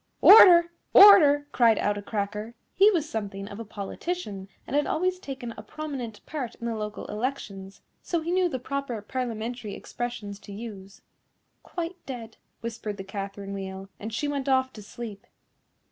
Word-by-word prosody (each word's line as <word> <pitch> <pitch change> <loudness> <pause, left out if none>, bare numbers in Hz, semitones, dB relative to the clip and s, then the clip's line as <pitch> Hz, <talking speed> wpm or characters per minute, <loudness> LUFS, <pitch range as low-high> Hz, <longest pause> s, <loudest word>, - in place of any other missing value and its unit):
"Order! 345 -5 +9 0.2
order!" 300 -8 +9
cried 230 -3 +4
out 205 - +1
a 205 - -5
Cracker. 210 +2 -4 0.2
He 395 +3 +6
was 335 -7 0
something 200 -5 -5
of 200 +1 -9
a - - -4
politician, 205 - -5 0.2
and - - -4
had 295 - +2
always 365 +2 0
taken 265 -7 -6
a - - -8
prominent 250 -4 -7
part 265 -7 -5
in 235 - -8
the 235 - -1
local 210 -1 -5
elections, 210 -5 -5 0.2
so 340 -2 -2
he 335 +2 -3
knew 365 -1 +2
the 260 - -3
proper 260 -2 -4
Parliamentary 235 -2 -4
expressions 215 -5 -6
to 205 - -12
use. 200 -3 -9 0.6
"Quite 350 +1 -6
dead," 235 -4 -7 0.2
whispered 220 -3 -5
the 190 - -6
Catherine 200 0 -6
Wheel, 195 0 -6
and 215 +2 -6
she 265 +7 -2
went 280 -1 -2
off 260 0 +2
to 215 - -10
sleep. 210 -1 -9
235 Hz, 165 wpm, -26 LUFS, 205-290 Hz, 0.6 s, Order